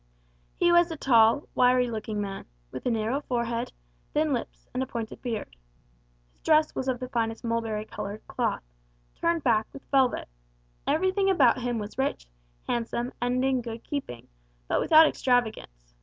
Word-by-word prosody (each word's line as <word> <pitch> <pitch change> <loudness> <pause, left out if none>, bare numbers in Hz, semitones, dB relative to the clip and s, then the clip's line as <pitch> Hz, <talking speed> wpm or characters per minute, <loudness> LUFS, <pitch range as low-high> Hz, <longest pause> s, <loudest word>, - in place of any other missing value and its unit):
He 345 - +3
was 345 0 +5
a 325 - -5
tall, 230 0 +4
wiry 250 0 +4
looking 215 -1 -4
man, 195 -1 -4 0.3
with - - -5
a - - +3
narrow 230 +4 0
forehead, 235 -2 -2 0.4
thin 305 -1 +2
lips, 240 - -5
and 255 - -1
a 260 - -2
pointed 230 -2 -6
beard. 225 - -4 0.8
His - - -36
dress 310 0 +3
was 265 - -3
of 255 -2 0
the 255 - -5
finest 225 -2 -2
mulberry 225 -2 -2
coloured 210 0 -7
cloth, - - -1 0.5
turned 335 -2 0
back 220 -4 +2
with 275 - -12
velvet; 265 -3 +2 0.6
everything 375 +6 +2
about 265 -9 +4
him 245 -1 -1
was 210 +3 -6
rich, 265 - -1 0.4
handsome, 240 +1 -2
and 250 +1 +1
in 265 -2 +1
good 230 -1 -7
keeping, 270 - -5 0.4
but - - +1
without 315 0 +7
extravagance. 220 - -1
245 Hz, 160 wpm, -27 LUFS, 225-275 Hz, 0.8 s, without